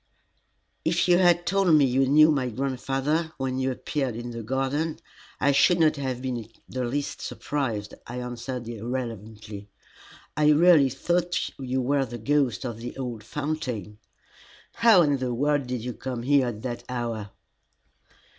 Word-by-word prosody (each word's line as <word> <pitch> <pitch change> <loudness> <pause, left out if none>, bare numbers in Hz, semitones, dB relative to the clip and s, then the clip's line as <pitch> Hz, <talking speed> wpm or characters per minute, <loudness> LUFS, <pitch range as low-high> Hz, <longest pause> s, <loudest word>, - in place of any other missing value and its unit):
"If 170 +2 +1
you 175 0 +5
had 175 -1 +4
told 195 -1 +2
me 145 -2 +6
you 130 +1 +2
knew 155 +3 +6
my 130 -4 0
grandfather 135 +5 -1
when 130 -1 -2
you 130 0 0
appeared 130 -1 -2
in 120 +1 -6
the 115 0 -6
garden, 135 +7 -1 0.4
I 140 - +3
should 170 +5 +4
not 155 -2 +4
have 130 -2 -3
been 130 -2 -2
in 115 -2 -8 0.2
the 130 -1 -3
least 140 +4 -3
surprised," 115 -8 -3
I 120 - -6
answered 125 0 -5
rather 115 -2 -6
irrelevantly. 110 -3 -6 0.7
"I 150 0 +4
really 155 -3 +6
thought 175 +6 -1
you 130 -1 -1
were 140 +1 +1
the 120 -1 -7
ghost 135 -2 0
of 115 -3 -5
the 120 +3 -7
old 120 -5 -5
fountain. 125 - -4 0.7
How 225 -6 +6
in 145 -2 +2
the 125 -2 -2
world 145 +1 +1
did 125 -3 -3
you 125 0 -4
come 125 -2 -5
there 135 0 +3
at 110 -3 -5
that 120 -2 -4
hour?" 115 -4 -3
130 Hz, 165 wpm, -26 LUFS, 120-145 Hz, 0.7 s, me